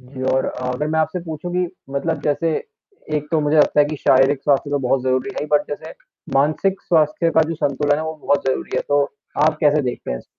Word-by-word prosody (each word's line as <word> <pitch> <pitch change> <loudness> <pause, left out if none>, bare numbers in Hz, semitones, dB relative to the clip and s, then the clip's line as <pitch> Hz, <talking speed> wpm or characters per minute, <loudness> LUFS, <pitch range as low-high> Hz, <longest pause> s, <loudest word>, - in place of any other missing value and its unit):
जी 130 +1 -10
और 130 - +2
अगर 125 +3 -3
मैं 160 - +1
आपसे 160 +3 -1
पूछूँ 160 +1 -6
कि 180 0 +1 0.3
मतलब 160 +4 -1
जैसे 155 +3 0 0.7
एक 150 0 -3
तो 160 - +3
मुझे 150 +1 +1
लगता 150 0 +4
है 145 - +6
कि 150 0 -4
शारीरिक 135 +1 +3
स्वास्थ्य 145 0 +1
तो 145 - +1
बहुत 130 0 0
ज़रूरी 130 +8 0
है, 150 - -3
बट 150 0 +3
जैसे 155 +2 -6 0.4
मानसिक 155 +8 +1
स्वास्थ्य 160 0 +2
का 160 - +7
जो 165 - -2
संतुलन 145 0 +1
है 155 - -3
वो 160 - -4
बहुत 145 -1 +1
ज़रूरी 130 - -2
है, - - 0
तो 145 0 +3 0.4
आप 155 - +2
कैसे 150 -1 +3
देखते 125 -1 -4
हैं 60 - -2
इस? - - -15
145 Hz, 225 wpm, -20 LUFS, 135-160 Hz, 0.7 s, का